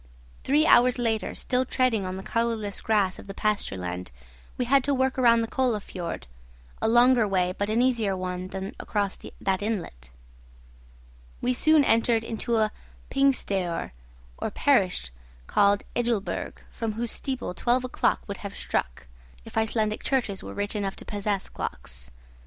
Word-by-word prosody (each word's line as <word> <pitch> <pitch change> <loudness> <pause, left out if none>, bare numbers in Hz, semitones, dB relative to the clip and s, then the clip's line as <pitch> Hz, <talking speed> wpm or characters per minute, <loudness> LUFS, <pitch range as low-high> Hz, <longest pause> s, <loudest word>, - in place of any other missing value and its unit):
Three 295 +3 +3
hours 250 -3 +6
later, 225 -3 -1
still 255 0 0
treading 245 -6 +1
on 185 +1 -4
the 190 - -7
colourless 230 -3 -1
grass 205 -4 +1
of - - -11
the 195 - -7
pasture 210 - 0
land, 90 0 -5 0.5
we 250 - 0
had 270 +2 +4
to 285 0 +2
work 260 0 +1
round 235 -3 +4
the - - -2
Kolla 250 -3 +1
fiord, 175 - -6 0.6
a - - +2
longer 240 0 +5
way 185 -2 +1
but 200 +1 -2
an 230 +3 +3
easier 225 -7 +1
one 180 0 -4
than 190 +1 -5
across 205 -2 -1 0.2
that 190 0 0
inlet. 175 - -4 1.3
We 250 - +1
soon 310 +4 +5
entered 230 -2 +3
into 230 +1 -1
a 215 -1 +2 0.4
'pingstaoer' 200 -11 +1 0.5
or - - -2
parish 60 -1 +1 0.3
called 200 - +3
Ejulberg, 235 -4 -1 0.2
from 225 -2 -3
whose 230 +1 -2
steeple 260 -8 -3
twelve 245 +6 +1
o'clock 255 - +1
would 200 -1 -5
have 200 -1 -7
struck, 65 -1 -2 0.4
if - - -11
Icelandic 220 -1 0
churches 240 -8 0
were - - -8
rich 205 +1 -2
enough 200 -2 -2
to - - -7
possess 205 -1 -2
clocks. 60 -1 -7
215 Hz, 160 wpm, -26 LUFS, 195-245 Hz, 1.3 s, hours